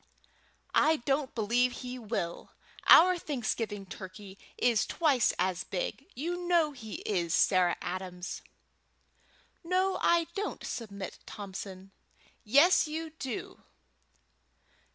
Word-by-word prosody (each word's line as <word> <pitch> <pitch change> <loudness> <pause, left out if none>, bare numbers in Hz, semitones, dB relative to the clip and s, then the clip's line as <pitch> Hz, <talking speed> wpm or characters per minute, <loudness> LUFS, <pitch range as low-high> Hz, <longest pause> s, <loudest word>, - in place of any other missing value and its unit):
"I 315 +1 +5
don't 275 0 -1
believe 240 +3 +2
he 250 0 -5
will. 210 -7 -4 0.3
Our 360 +1 +8
Thanksgiving 225 -8 -3
turkey 190 +1 -10 0.2
is 235 -3 +2
twice 280 -9 +2
as 185 0 0
big. 190 +9 -4
You 350 +6 -3
know 335 -4 +3
he 225 -6 -8
is, 175 -5 0
Sarah 180 -2 +3
Adams." 180 0 -5 1.2
"No, 370 +2 +1
I 340 -1 +4
don't, 415 +1 -4
Submit 200 -5 -6
Thompson." 195 -1 -8 0.5
"Yes, 285 - +5
you 320 +1 -4
do." 260 -4 -5
235 Hz, 105 wpm, -30 LUFS, 195-310 Hz, 1.2 s, Our